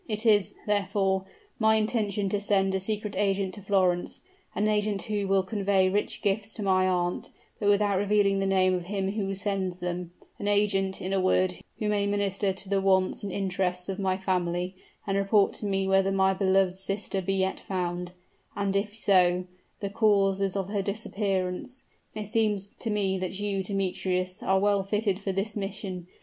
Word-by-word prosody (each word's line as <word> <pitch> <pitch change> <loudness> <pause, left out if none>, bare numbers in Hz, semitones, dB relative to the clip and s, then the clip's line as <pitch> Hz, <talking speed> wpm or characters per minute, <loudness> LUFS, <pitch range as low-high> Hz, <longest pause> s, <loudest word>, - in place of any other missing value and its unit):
It 215 +1 -2
is, 205 -4 +4
therefore, 195 -2 +1 0.3
my 220 -1 +4
intention 215 -2 0
to 205 +1 -1
send 195 -2 +2
a 190 - +1
secret 210 +1 -3
agent 195 -2 0
to 205 - -7
Florence 185 -3 +1 0.3
an 210 - +1
agent 210 -2 +1
who 205 -2 -2
will 195 0 +3
convey 195 -2 +2
rich 205 +2 -1
gifts 205 +1 -1
to 215 - -4
my 185 -1 +3
aunt, 175 -1 -1 0.3
but 205 - +2
without 200 -1 +3
revealing 200 -1 +2
the 195 - 0
name 185 -1 +3
of 180 -1 -2
him 195 0 -2
who 195 -2 -2
sends 190 -2 -2
them 180 -1 -4 0.3
an 205 - -3
agent, 200 -2 +1
in 190 +1 -2
a 195 - +2
word, 185 0 +2 0.2
who 215 - -2
may 205 -1 +1
minister 200 -1 0
to 190 +1 -4
the 195 0 +1
wants 190 -1 +2
and 200 - -4
interests 180 -1 -1
of 195 +1 -3
my 190 -1 +1
family, 180 -1 -1 0.3
and 195 0 0
report 200 0 +3
to 210 - -2
me 195 -1 0
whether 195 0 +3
my 190 0 +3
beloved 190 -1 +2
sister 195 0 -2
be 195 +1 -1
yet 190 0 0
found, 180 -1 -3 0.4
and 200 -1 -1
if 205 +1 -1
so, 180 -4 +3 0.4
the 200 - -2
causes 195 -3 +2
of 195 -1 -2
her 205 -1 0
disappearance. 200 +3 -2 0.3
It 210 -1 -4
seems 210 -3 0
to 230 - -3
me 195 -3 0
that 185 +1 -4
you, 200 -1 -1
Demetrius, 185 -1 -2
are 190 - +2
well 200 0 +3
fitted 200 0 0
for 200 -1 -2
this 195 +3 -2
mission. 195 -3 -5
195 Hz, 185 wpm, -27 LUFS, 190-205 Hz, 0.4 s, is